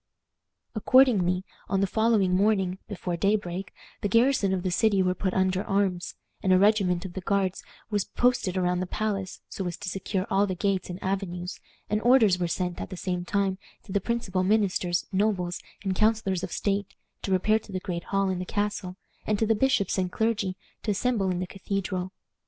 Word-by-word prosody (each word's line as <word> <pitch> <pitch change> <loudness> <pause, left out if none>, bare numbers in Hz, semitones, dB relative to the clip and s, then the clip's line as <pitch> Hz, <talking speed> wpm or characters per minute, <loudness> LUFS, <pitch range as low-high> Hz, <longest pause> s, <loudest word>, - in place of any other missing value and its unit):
Accordingly, 210 -6 +4 0.2
on 195 - +1
the 195 - +3
following 210 -2 +2
morning, 190 -2 +2
before 180 -4 -3
daybreak, 195 -1 -1 0.3
the 205 - 0
garrison 230 -2 +3
of 185 -2 -1
the 185 - 0
city 200 0 +3
were 180 0 +2
put 185 +1 -1
under 190 0 +2
arms, 195 -3 0 0.3
and 190 - +1
a 185 - +7
regiment 195 -3 +3
of 180 - -7
the 190 - -5
Guards 190 0 0 0.3
was 205 -2 +1
posted 245 -7 +1
around 180 -1 +1
the 185 - -2
palace, 195 -2 -3
so 190 - -4
as 175 - -4
to 205 - -5
secure 190 +1 -2
all 200 +1 +3
the 185 - -2
gates 195 0 -1
and 180 - -5
avenues; 185 -1 -3 0.3
and 210 +1 0
orders 230 -7 +5
were 175 - 0
sent, 180 +1 -2
at - - -5
the 185 - -7
same 180 -1 -2
time, 195 -1 0 0.2
to 200 - -11
the 200 - +1
principal 205 -5 -1
ministers, 185 -3 +1
nobles, 190 -3 0 0.2
and 190 -2 0
counselors 215 -3 +2
of 190 -2 -5
state, 200 -1 -1 0.3
to 195 - -3
repair 215 +4 +3
to 215 - -14
the 185 - -2
great 175 -2 -4
hall 195 -1 +1
in 185 -1 -1
the - - -2
castle, 205 -1 -2 0.3
and 215 - +2
to 220 - +2
the 225 - +3
bishops 210 -5 +1
and 180 -1 -1
clergy 215 -4 0 0.2
to - - -4
assemble 210 -1 +1
in 180 - 0
the 185 - -2
Cathedral. 190 -1 -3
195 Hz, 195 wpm, -27 LUFS, 185-210 Hz, 0.3 s, a